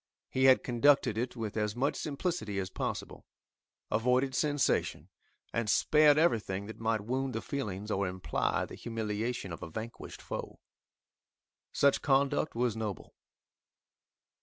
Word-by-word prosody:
He 130 0 +2
had 130 -1 +6
conducted 125 -1 +3
it 120 +3 -2
with 110 -3 -4
as 105 -1 -1
much 135 +4 0
simplicity 150 - -3
as 95 -1 -2
possible, - - -5 0.6
avoided 125 +5 +2
sensation, 145 - 0 0.4
and 115 -2 -1
spared 150 +6 +5
everything 105 - +1
that 110 - -9
might 110 -1 0
wound 130 +4 -2
the 110 - -2
feelings 105 -6 -4
or 100 -1 0
imply 90 -4 -1
the - - -12
humiliation 110 -3 -3
of 85 - -8
a - - -6
vanquished 110 +7 -7
foe. - - -6 1.1
Such 140 -1 +3
conduct 140 +1 +2
was 120 -2 +1
noble. 110 -3 -5
115 Hz, 135 wpm, -31 LUFS, 105-135 Hz, 1.1 s, had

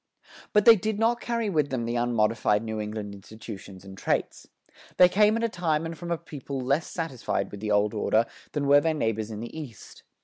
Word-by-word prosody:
But 210 -1 +3
they 230 - +10
did 215 +1 -2
not 230 +2 +1
carry 235 -2 -1
with 155 -7 +1
them 125 -3 -2
the 120 +1 -2
unmodified 115 -3 +1
New 110 -1 -4
England 105 -1 -5
institutions 100 -2 -10
and 95 0 -10
traits. - - -2 0.5
They 180 - +8
came 210 +4 +3
at 230 - -2
a - - +3
time 165 -6 -1
and 165 0 -5
from 170 +2 -8
a 170 - 0
people 140 -4 -7
less 140 +6 0
satisfied 130 - -3
with 100 - -8
the 105 +1 -4
old 105 +1 +2
order 110 +1 +2 0.3
than 145 -2 -1
were 145 +1 +6
their 160 0 0
neighbors 110 -5 -1
in 110 -1 -6
the 120 - -8
East. 140 -9 -10
130 Hz, 210 wpm, -26 LUFS, 110-170 Hz, 0.5 s, they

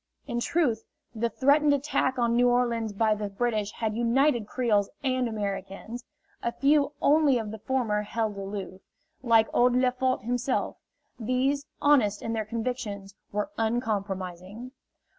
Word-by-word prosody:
In 240 -4 -2
truth, 255 -6 0 0.3
the 235 +1 -1
threatened 285 +5 +3
attack 265 -2 0
on 235 -1 +2
New 245 +1 +4
Orleans 235 -3 +1
by 215 +1 +2
the 210 -1 -4
British 210 0 -1
had 220 -2 -2
united 240 0 +2
Creoles 215 -6 +1
and 255 -2 +1
Americans. 205 +2 -5 0.4
A 235 - -1
few 285 +3 +2
only 290 -3 +4
of 220 -3 -4
the 220 - -7
former 225 -3 0
held 215 0 -2
aloof 195 -1 -6 0.4
like 225 -3 +4
old 245 0 +4
Lefort 255 -1 +1
himself; 245 +2 -1 0.4
these, 255 +5 0 0.2
honest 240 -9 +3
in 225 - -2
their 220 -1 -2
convictions, 220 -3 -4 0.2
were 210 +8 -2
uncompromising. 205 -2 -3
235 Hz, 140 wpm, -27 LUFS, 210-255 Hz, 0.4 s, New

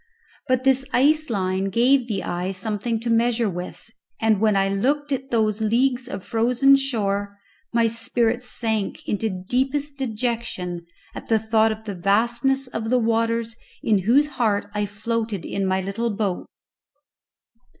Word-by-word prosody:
But 255 -1 +1
this 265 0 +3
ice 305 +3 +3
line 190 -3 -1
gave 245 +5 +3
the 205 -4 -2
eye 180 +2 -3
something 215 +4 -2
to 235 - -3
measure 230 0 +2
with, 180 +5 -8 0.3
and 220 -2 +2
when 215 -2 +3
I 195 0 +3
looked 280 +9 0
at 270 0 -2
those 220 -3 +1
leagues 245 +3 +1
of 195 -5 -6
frozen 250 +4 +4
shore 205 -7 -1 0.3
my 235 -1 +3
spirits 230 +2 0
sank 220 -5 -2
into 220 +2 -1
deepest 265 +9 -2
dejection 220 -8 -3 0.3
at - - -9
the 225 - +3
thought 220 0 +2
of 220 0 -7
the 205 - -4
vastness 235 +8 +1
of 225 -2 -4
the 255 - +3
waters 230 0 0 0.3
in 215 -3 +3
whose 240 +10 +4
heart 225 -8 -1
I 210 0 -1
floated 220 -1 -3
in 195 -1 -2
my 190 0 +1
little 200 +5 -2
boat. 205 -4 -2
225 Hz, 150 wpm, -23 LUFS, 200-245 Hz, 0.3 s, frozen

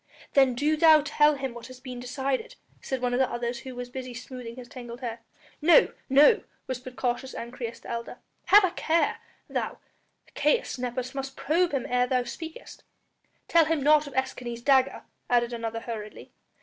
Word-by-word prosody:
"Then 265 -3 +5
do 300 +5 +1
thou 310 -2 +7
tell 300 0 +4
him 270 -3 -4
what 235 -1 -9
has 255 -1 -12
been 250 -1 -8
decided," 270 - -3 0.3
said 260 -2 -4
one 245 0 +1
of 245 - +1
the 260 -1 +3
others 240 0 -3
who 260 +1 -9
was 245 0 -6
busy 255 -1 -6
smoothing 235 -1 -8
his 250 -1 -10
tangled 240 0 -9
hair. 235 -2 -4 0.4
"No, 345 +10 +6 0.2
no!" 295 - +6 0.2
whispered 255 0 -6
cautious 250 +1 -2
Ancyrus, 235 -1 -6
the - - -8
elder, 235 0 -5 0.3
"have 410 +1 +7
a 370 - +2
care... 335 -1 +1 0.3
thou, - - -3 0.6
Caius - - +1
Nepos, 250 +1 -3
must 270 0 -5
probe 340 +4 +1
him 275 -4 -1
ere 250 0 +2
thou 250 -1 +1
speakest." 320 +6 -9 0.6
"Tell 335 -1 +5
him 315 -2 0
naught 300 0 +5
of 280 - -10
Escanes' 245 -3 -3
dagger," 270 -1 +3 0.3
added 240 0 +2
another 230 -1 -4
hurriedly. 215 -3 -7
255 Hz, 175 wpm, -27 LUFS, 245-290 Hz, 0.6 s, thou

